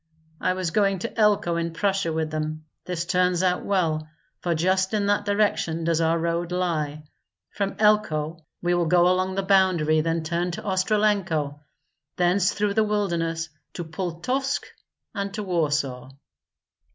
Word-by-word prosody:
"I 185 - +1
was 185 -2 -2
going 195 0 +2
to 230 +6 -5
Elko 205 -6 +2
in 170 0 -2
Prussia 195 -1 0
with 160 -1 -2
them; 155 0 -3 0.2
this 175 -2 -3
turns 180 0 +2
out 180 -1 +1
well, 160 -6 0 0.3
for 175 -2 -1
just 190 +4 +1
in 205 -1 +1
that 205 0 +1
direction 205 -5 +1
does 165 0 +1
our 165 +1 +2
road 170 +1 -1
lie. 155 -5 -1 0.5
From 200 -1 -2
Elko 165 -7 +2 0.2
we 175 0 +2
will 175 -1 +1
go 175 +1 +5
along 185 +1 +1
the 195 - 0
boundary, 185 -5 +3
then 165 0 -1
turn 170 +2 -1
to 215 - -6
Ostrolenko, 190 -7 +1 0.6
thence 180 +1 +2
through 205 0 0
the 220 +1 +3
wilderness 170 -6 -1 0.2
to 175 - -4
Pultusk 185 - -2 0.5
and 200 -2 -3
to 210 - -3
Warsaw." 145 -8 -1
175 Hz, 150 wpm, -25 LUFS, 165-200 Hz, 0.6 s, go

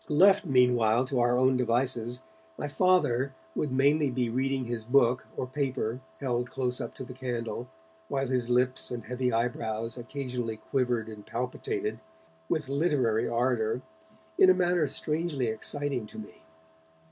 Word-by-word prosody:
Left 190 +5 +5
meanwhile 125 -3 +4
to 130 -1 -1
our 120 0 +3
own 130 0 +4
devices, 125 0 0 0.4
my 145 - -3
Father 140 -6 +2 0.2
would 150 - -2
mainly 140 +3 +3
be 125 -2 -1
reading 130 +2 0
his 120 -2 -3
book 125 +1 +3
or - - -1
paper 130 -3 -2 0.2
held 125 -3 -1
close 125 -1 -1
up - - -6
to - - -6
the 125 - -9
candle, 125 -1 -4 0.4
while 135 +6 -1
his 125 -2 -1
lips 125 +1 +2
and 120 -2 -5
heavy 125 0 -1
eyebrows 115 -1 -1
occasionally 125 -3 -4
quivered 120 -1 -1
and 105 -2 -9
palpitated, 115 -3 -3 0.5
with 150 -4 0
literary 140 -6 +1
ardour, 120 0 0 0.6
in - - +8
a 185 - +7
manner 175 -3 +2
strangely 150 -1 0
exciting 125 +2 -1
to - - -11
me. 110 -1 -8
125 Hz, 145 wpm, -29 LUFS, 120-135 Hz, 0.6 s, in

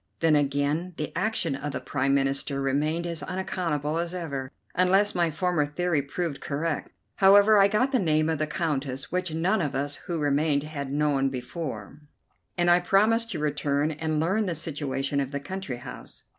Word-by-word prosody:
Then, 160 -2 +3
again, 145 +5 0
the 150 - -4
action 210 -8 0
of 145 +1 -4
the 130 - -2
Prime 135 +1 0
Minister 135 0 0
remained 150 +5 0
as 170 -2 -4
unaccountable 165 -3 -2
as 170 +1 -3
ever, 140 -7 -4 0.2
unless 190 +3 +3
my 170 -1 +2
former 175 0 0
theory 155 +1 0
proved 145 +1 -4
correct. 150 +2 -2 0.3
However, 205 +2 +7
I 195 - +7
got 220 +6 +1
the 260 - +3
name 155 -3 +2
of 160 -2 0
the 155 - 0
Countess, 145 -5 -3
which 180 -1 -1
none 180 +6 +1
of 145 -4 -2
us 145 +2 -2
who 170 - -1
remained 145 0 +1
had 140 -3 -5
known 145 -2 +1
before, 130 - -6 0.6
and 175 0 +4
I 175 - +6
promised 220 +5 +3
to 175 - -3
return 145 0 0
and 155 0 -2
learn 195 +6 +1
the 170 - -1
situation 145 -3 -2
of 135 -2 -1
the 140 0 -3
country 145 -3 -5
house. 125 +1 -9
155 Hz, 180 wpm, -26 LUFS, 140-180 Hz, 0.6 s, However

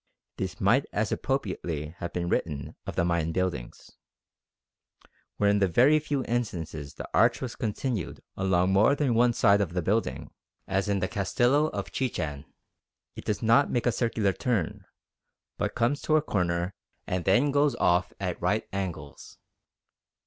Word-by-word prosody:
This 95 -2 -4
might 115 +8 +3
as 105 +1 -1
appropriately 90 - -2
have 85 - -4
been 85 -1 -2
written 75 -4 -2
of - - -4
the 85 - +2
Mayan 85 -2 0
buildings. 90 -9 -3 1.5
Where 105 - +2
in 100 - +2
the 100 - +3
very 130 - +5
few 145 -3 -2
instances 80 - -3
the - - -7
arch 115 0 +4
was 130 -3 -5
continued 110 - -3 0.2
along 95 -1 +2
more 105 +9 +5
than 140 -4 +1
one 120 +1 +4
side 100 -3 +4
of 90 -4 -2
the 90 - 0
building, 110 +6 -1 0.4
as 95 +2 0
in 100 -2 +1
the 95 - +1
Castillo 120 +9 +2
of 100 -8 -5
Chichen, 75 - -3 0.7
it - - -9
does 105 0 -2
not 115 +6 +4
make 120 - -1
a 120 - +4
circular 110 -5 0
turn, 110 -9 -2 0.7
but - - -1
comes 120 +5 +1
to 155 - +2
a 155 - +4
corner 90 - -1 0.3
and 90 -2 -2
then 125 +10 +4
goes 145 0 +2
off 90 0 +2
at 90 -3 -3
right 100 +5 0
angles. 85 -7 -6
100 Hz, 160 wpm, -27 LUFS, 90-120 Hz, 1.5 s, very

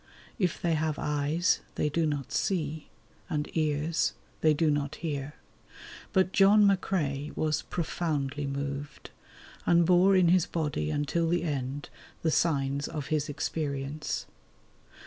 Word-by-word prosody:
If 180 -5 0
they 170 -1 +1
have 155 -1 0
eyes, 150 +3 +1 0.2
they - - +1
do 160 +2 +1
not 145 -3 -3
see; 155 -5 -1 0.4
and 150 0 -1
ears, 155 +1 +1 0.3
they 155 - +4
do 155 +1 +2
not 145 0 -1
hear. 145 -3 -4 0.8
But 185 -2 +2
John 205 +2 +6
McCrae 155 -7 0
was 155 -1 +1
profoundly 145 -4 -2
moved, 140 +1 -5 0.5
and 170 0 +4
bore 180 +3 +5
in 180 -2 +5
his 180 -1 +4
body 150 - -2
until 145 - 0
the 175 0 +1
end 140 -2 -3 0.3
the 160 - +2
signs 140 -3 +1
of 150 -4 -5
his 150 -1 0
experience. 145 0 -3
155 Hz, 130 wpm, -29 LUFS, 145-170 Hz, 0.8 s, John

